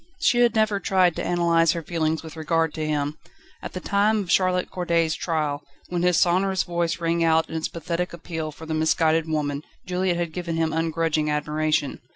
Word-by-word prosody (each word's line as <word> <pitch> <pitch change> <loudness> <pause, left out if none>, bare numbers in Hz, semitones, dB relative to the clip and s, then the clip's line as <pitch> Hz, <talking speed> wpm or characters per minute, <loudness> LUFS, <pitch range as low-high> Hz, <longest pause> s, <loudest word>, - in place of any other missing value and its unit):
She 245 -8 +3
had 240 -2 +4
never 215 -2 +2
tried 185 -4 +2
to - - -2
analyse 170 -2 +3
her 170 - -4
feelings 160 -1 -1
with 160 0 -9
regard 160 0 0
to 155 - -4
him. 150 0 -2 0.4
At - - -7
the 185 - -4
time 205 +3 +2
of 175 - -5
Charlotte 185 -1 +2
Corday's 170 -3 +1
trial, 150 -4 -2 0.3
when 175 -1 -1
his 180 -1 +3
sonorous 190 +2 +2
voice 170 -1 -1
rang 170 0 +1
out 160 0 +3
in - - -7
its 160 - -1
pathetic 170 +2 -3
appeal 160 -2 -5
for 160 +2 -11
the 160 - -3
misguided 160 0 +2
woman, 145 -2 -1 0.2
Juliette 180 -1 0
had 170 -2 -3
given 170 -2 -3
him 160 -1 0
ungrudging 160 -1 0
admiration. 150 -1 -1
165 Hz, 195 wpm, -24 LUFS, 160-180 Hz, 0.4 s, had